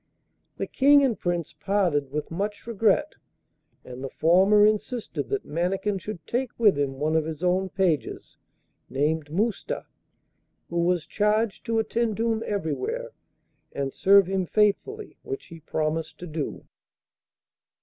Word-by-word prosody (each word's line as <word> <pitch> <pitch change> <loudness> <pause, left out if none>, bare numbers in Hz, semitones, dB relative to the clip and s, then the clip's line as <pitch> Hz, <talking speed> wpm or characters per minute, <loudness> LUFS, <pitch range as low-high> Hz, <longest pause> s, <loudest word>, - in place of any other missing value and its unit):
The - - -2
King 285 +1 +5
and 250 -5 +1
Prince 175 -2 -2
parted 175 -9 0
with 150 +3 -4
much 200 +4 -3
regret, 235 +7 +2 0.7
and 125 +1 -8
the 135 - -4
former 190 +8 +5
insisted 215 +2 -1
that 410 0 -2
Mannikin 190 +5 -1
should 180 -4 -7
take 250 +1 -1
with 215 -4 +5
him 140 -1 -1
one 155 +3 0
of 160 -1 +2
his 160 +1 -6
own 185 +1 +1
pages, 180 -6 -1 0.5
named 150 +3 0
Mousta, 205 +8 -2 0.8
who 170 - -1
was 175 -2 +1
charged 210 +3 0
to 225 0 +1
attend 225 0 0
to 230 +1 +1
him 220 - -3
everywhere, 215 - -2 0.6
and 135 -1 -3
serve 200 0 +6
him 190 -1 -1
faithfully, 220 - 0
which 405 -1 -6
he 165 - -11
promised 155 +1 -2
to 180 - -8
do. 155 -3 -5
190 Hz, 140 wpm, -26 LUFS, 160-220 Hz, 0.8 s, serve